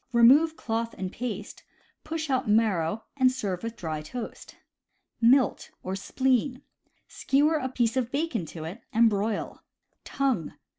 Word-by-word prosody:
Remove 285 +8 +6
cloth 230 0 -3
and 185 -1 -4
paste, 215 -4 -5 0.4
push 315 -2 -3
out 255 -4 0
marrow, 210 -3 +2
and 255 -2 +5
serve 200 -8 -3
with 230 0 -5
dry 160 -6 -4
toast. 225 +10 -8 0.7
Milt 250 +3 +4 0.2
(Spleen). 255 +5 0 0.2
— - - -43
Skewer 295 +4 +3
a 260 -3 -2
piece 240 -2 0
of 250 -2 -1
bacon 275 - -1
to 160 0 -8
it, 175 +9 -7
and 230 0 +5
broil. 205 +1 -2 0.4
Tongue. 260 - -1
230 Hz, 140 wpm, -27 LUFS, 205-265 Hz, 0.7 s, Remove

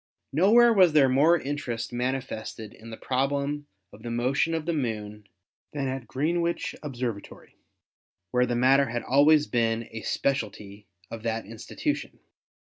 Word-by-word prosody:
Nowhere 230 - +5
was 185 -6 +5
there 145 -3 +6
more 150 +7 +4
interest 125 -6 -4
manifested 120 -3 -4
in 115 - -13
the 110 - -8
problem 140 +2 -1 0.3
of 105 - -14
the 120 - -6
motion 130 +7 0
of 160 -1 -3
the 170 - -1
Moon 105 -7 -4 0.5
than 140 -2 -2
at 130 -3 -5
Greenwich 170 +7 -1
Observatory, 125 -7 -6 0.8
where 125 0 +2
the 120 - -1
matter 135 +3 +4
had 120 +1 -3
always 150 +3 +4
been 115 -2 0
a 110 - -6
spe 140 - 0
cialty 105 -4 -7 0.3
of 115 - -6
that 115 0 -3
institution. 200 - -4
130 Hz, 145 wpm, -26 LUFS, 115-145 Hz, 0.8 s, there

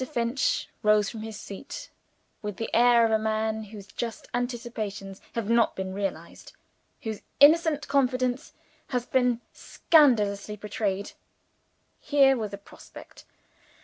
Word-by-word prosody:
Finch 260 - -1
rose 210 -1 +3
from 225 - -7
his 220 -1 -7
seat, 195 - -9 0.5
with 210 -2 -5
the 225 - -5
air 240 0 +6
of 225 - 0
a 220 - +3
man 220 0 -1
whose 205 -1 -11
just 230 +2 -6
anticipations 230 -5 -4
have 230 -3 -2
not 230 0 +3
been 190 0 -4
realized 190 -4 -5 0.5
whose 220 -3 -4 0.2
innocent 305 0 +5
confidence 255 -2 0 0.4
has 250 -2 -2
been 250 -2 +1
scandalously 210 -10 +2
betrayed. 205 -1 -3 0.9
Here 275 -2 +4
was 220 -4 -4
a 200 - -6
prospect! 200 - -14
225 Hz, 125 wpm, -27 LUFS, 210-250 Hz, 0.9 s, air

